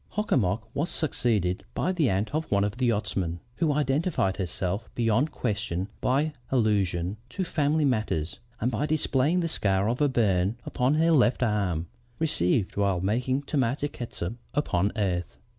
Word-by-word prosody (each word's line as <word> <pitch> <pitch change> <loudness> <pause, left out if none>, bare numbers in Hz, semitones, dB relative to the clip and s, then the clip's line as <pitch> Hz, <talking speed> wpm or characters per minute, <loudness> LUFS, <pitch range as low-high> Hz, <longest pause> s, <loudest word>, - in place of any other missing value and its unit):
Hock 210 +1 -3
a - - +5
mock 110 0 0
was 155 +5 -1
succeeded 110 - 0
by 185 - +1
the 165 -8 +2
aunt 100 +6 -1
of 155 +1 -1
one 100 -1 +3
of 105 +2 -2
the 125 -1 +1
yachtsmen, 95 -6 -1 0.2
who 165 -3 +2
identified 145 - +1
herself 95 +3 -2
beyond 120 +6 +2
question 100 -5 -2
by 145 +4 +1 0.2
allusion 100 -6 +1
to 185 - -2
family 155 -2 +1
matters 110 - -1 0.2
and 125 +4 0
by 140 +6 -1
displaying 155 +2 +2
the 170 - 0
scar 100 -9 +1
of 120 +5 -1
a 145 - +4
burn 100 -4 +2
upon 130 +4 +1
her 165 +2 +3
left 125 -4 +4
arm, 100 -7 0 0.3
received 105 - +1
while 100 -3 +2
making 125 +8 0
tomato 140 0 0
catsup 115 -8 -5 0.2
upon 100 -9 +1
earth. 90 -5 -1
115 Hz, 160 wpm, -27 LUFS, 95-145 Hz, 0.3 s, a